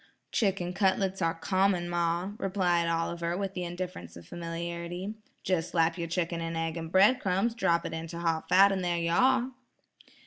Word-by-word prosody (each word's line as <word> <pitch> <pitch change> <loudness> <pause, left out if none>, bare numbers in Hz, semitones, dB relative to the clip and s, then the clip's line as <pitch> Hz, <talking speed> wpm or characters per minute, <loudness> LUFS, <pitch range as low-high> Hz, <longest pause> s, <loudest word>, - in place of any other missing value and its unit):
"Chicken 190 -5 0
cutlets 190 0 +1
are 165 -1 +1
common, 185 +1 +1
ma," 175 +2 0
replied 180 -3 +1
Oliver, 170 +1 -1
with 195 -1 -3
the 180 - -3
indifference 175 - -6
of 85 - -12
familiarity. 170 +3 -5 0.3
"Just 180 -3 0
slap 165 -1 +2
your 170 -2 -4
chicken 170 0 -2
in 165 0 -3
egg 165 0 -2
and 165 -1 -6
bread 205 +8 +5
crumbs, 195 +3 0
drop 170 -7 +1
it - - -4
into 165 +1 -5
hot 165 -2 -1
fat 195 +2 +7
and 190 -1 -1
there 175 -1 0
you 170 0 0
are." 260 +6 +3
175 Hz, 175 wpm, -29 LUFS, 165-190 Hz, 0.3 s, fat